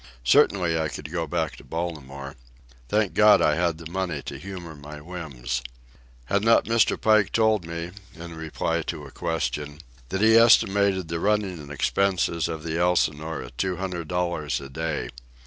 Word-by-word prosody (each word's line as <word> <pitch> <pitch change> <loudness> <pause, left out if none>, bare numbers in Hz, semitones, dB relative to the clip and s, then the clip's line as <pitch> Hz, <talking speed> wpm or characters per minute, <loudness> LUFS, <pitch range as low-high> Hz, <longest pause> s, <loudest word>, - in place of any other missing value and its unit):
Certainly 85 +5 +3
I 80 - 0
could 75 0 -7
go 85 -2 -2
back 80 0 -2
to - - -13
Baltimore. 70 -5 -5 0.5
Thank 105 -3 +1
God 105 0 +6
I 75 - +3
had 85 0 0
the 80 0 -9
money 90 -6 -2
to - - -7
humour 90 -4 -8
my 75 +1 -10
whims. 70 -7 -5 0.6
Had 100 +6 0
not 115 +1 +5
Mr. 115 -1 +2
Pike 110 -2 +3
told 110 -6 +2
me, 85 +1 -5 0.2
in 85 0 -9
reply 80 +1 -2
to 75 -1 -5
a 70 - -11
question, 75 -3 -3 0.3
that 95 - -2
he 110 +1 +6
estimated 100 -5 +5
the 85 +1 -3
running 95 -7 -1
expenses 85 +2 0
of 80 -2 -5
the 85 0 -2
Elsinore 80 -3 0
at - - -12
two 95 -1 0
hundred 90 -4 -4
dollars 85 -4 -1
a 70 0 -9
day? 80 -3 -3
85 Hz, 165 wpm, -25 LUFS, 75-95 Hz, 0.6 s, God